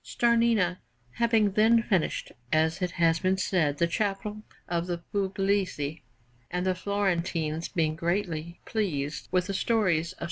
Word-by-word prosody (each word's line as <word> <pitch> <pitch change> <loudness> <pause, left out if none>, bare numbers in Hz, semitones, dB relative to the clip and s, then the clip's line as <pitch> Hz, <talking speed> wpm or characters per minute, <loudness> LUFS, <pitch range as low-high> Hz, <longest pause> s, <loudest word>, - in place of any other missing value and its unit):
Starnina 230 -6 +2 0.4
having 225 -3 +3
then 225 +3 +4
finished, 190 -8 0 0.2
as 160 +2 +2
it 180 - +1
has 165 -1 +3
been 190 0 +1
said, 165 -6 +1
the 170 - +3
Chapel 205 +4 -2 0.3
of 170 0 -1
the 175 -1 -1 0.2
Pugliesi, 195 -6 0 0.5
and 180 +1 -2
the 185 - +2
Florentines 175 -5 -1
being 155 -2 0
greatly 170 -1 -2
pleased 155 -10 -2
with 180 -1 +2
the 195 - -3
stories 185 -6 +1
of - - -26
S. - - -22
185 Hz, 145 wpm, -28 LUFS, 165-205 Hz, 0.5 s, then